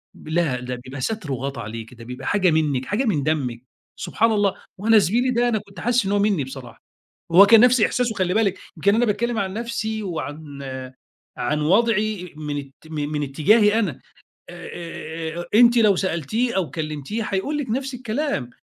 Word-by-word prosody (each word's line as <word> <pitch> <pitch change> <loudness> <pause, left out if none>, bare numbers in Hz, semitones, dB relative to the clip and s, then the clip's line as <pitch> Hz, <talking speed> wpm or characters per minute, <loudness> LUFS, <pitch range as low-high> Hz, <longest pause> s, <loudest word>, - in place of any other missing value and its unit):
لا، 155 -6 -1
ده 125 0 -4
بيبقى 135 +1 -7
ستر 165 - -3
وغَطّى 135 -1 -4
عليكِ، 115 +2 -7
ده 115 0 -12
بيبقى 125 +1 -8
حاجة 190 -3 +3
منِك، 150 -5 +1
حاجة 225 +7 0
من 165 - +1
دمِك، 130 -6 -1 0.3
سبحان 225 0 +1
الله! 205 -2 +2 0.2
وأنا 220 +2 +5
زميلي 235 +8 +2
ده، 240 0 +2
أنا 220 - +1
كنت 200 -1 -12
حاسِسّ 240 -3 +1
إن 200 - 0
هو 205 - +3
مِنِّي 200 -8 +1
بصراحة، 130 -2 -10 0.5
هو 195 +4 +9
كان 225 +1 +8
نفس 250 -1 +5
إحساسه 240 +1 +1
خلّي 185 -2 0
بالِك، 200 -4 +1 0.2
يمكن 200 +6 +3
أنا 240 +2 +3
باتكلّم 225 +2 0
عن 190 -1 -1
نفسي، 220 -2 -3
وعن 150 -5 -6 0.8
عن 150 +1 0
وضعي، 210 +2 +2
إإ 155 - -11
من 150 -1 -3
ات 140 -1 -7 0.2
من 150 -1 -2
اتِّجاهي 205 +10 +3
أنا، 185 - -1 0.5
آآ، 175 0 -9 0.7
آآ، - - -3
آآ، 175 - -5
أنتِ 240 +1 +6
لو 210 -4 +5
سألتيه 190 - -1
أو 180 -5 0
كلِّمتيه 155 +7 -4
هيقول 215 +10 -2
لِك 270 -6 -4
نفس 265 +3 -2
الكلام، 245 - -2
195 Hz, 185 wpm, -22 LUFS, 150-225 Hz, 0.8 s, هو